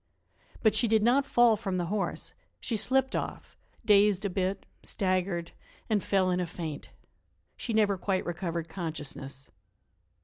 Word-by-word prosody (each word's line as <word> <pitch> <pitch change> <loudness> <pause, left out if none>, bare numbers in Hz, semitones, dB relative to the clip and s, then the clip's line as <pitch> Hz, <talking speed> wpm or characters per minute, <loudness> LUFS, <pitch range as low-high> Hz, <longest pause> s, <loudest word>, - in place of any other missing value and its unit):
But 220 - +5
she 235 - +2
did 220 -1 +3
not 265 +4 +3
fall 240 -4 +5
from 195 -4 -3
the 175 - 0
horse; 200 +3 -2 0.3
she 235 - -2
slipped 265 +5 +2
off, - - -4 0.3
dazed 205 -2 +5
a 200 - 0
bit, 190 +1 -1 0.2
staggered 185 -3 -1 0.4
and 210 -3 +2
fell 190 -2 +2
in 180 - +1
a 180 - -1
faint. 160 -3 -6 0.7
She 235 - -4
never 210 -3 +2
quite 190 0 0
recovered 170 -1 -3
consciousness. 150 -5 -5
195 Hz, 145 wpm, -29 LUFS, 175-215 Hz, 0.7 s, But